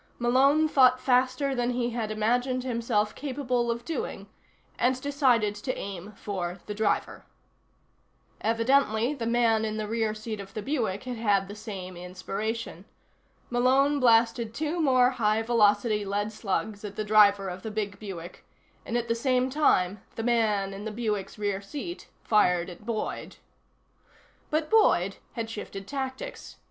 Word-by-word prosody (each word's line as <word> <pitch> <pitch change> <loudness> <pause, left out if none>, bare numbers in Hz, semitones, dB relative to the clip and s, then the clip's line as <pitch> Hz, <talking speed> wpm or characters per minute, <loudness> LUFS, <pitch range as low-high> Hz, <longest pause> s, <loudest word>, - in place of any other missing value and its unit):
Malone 270 +6 +4
thought 255 -4 +5
faster 255 +2 +2
than 245 -1 0
he 245 -1 -1
had 230 -2 -3
imagined 245 +4 0
himself 230 -4 0
capable 255 -4 -2
of 235 0 -2
doing, 330 - -4 0.5
and 255 +1 +2
decided 260 -7 +2
to 210 +5 -4
aim 195 0 -6
for 185 -3 -4
the 210 - -4
driver. 215 +1 -1 1.2
Evidently 230 +1 +2
the 235 -6 -4
man 230 -2 +3
in 215 0 -2
the 215 -1 -3
rear 220 -1 -1
seat 215 0 -6
of 195 0 -10
the 215 - -3
Buick 235 -9 -1
had 250 -2 -5
had 200 -3 +2
the 200 - -8
same 200 -4 -7
inspiration. 195 +6 -5 0.7
Malone 265 +4 +3
blasted 230 -2 +3
two 315 +4 -1
more 255 -4 +4
high 220 -2 +1
velocity 210 -2 +3
lead 205 +2 -2
slugs 210 0 -3
at 205 -1 -6
the 215 - -2
driver 205 -2 +5
of 180 0 -6
the 220 - -5
big 205 -2 -4
Buick, 180 -5 -8 0.4
and 235 - -2
at 240 -1 -2
the - - +2
same 255 +2 +1
time 200 -10 +2
the 225 - -4
man 215 -5 +1
in 195 +1 -7
the 220 - -3
Buick's 210 -3 -3
rear 205 -2 -1
seat 295 - -7 0.2
fired 180 -5 +2
at 180 +5 -13
Boyd. 225 -2 -3 1.1
But 310 0 0
Boyd 200 - +4 0.2
had 230 -1 -3
shifted 205 -3 -7
tactics. 265 -2 -6
225 Hz, 155 wpm, -27 LUFS, 205-250 Hz, 1.2 s, thought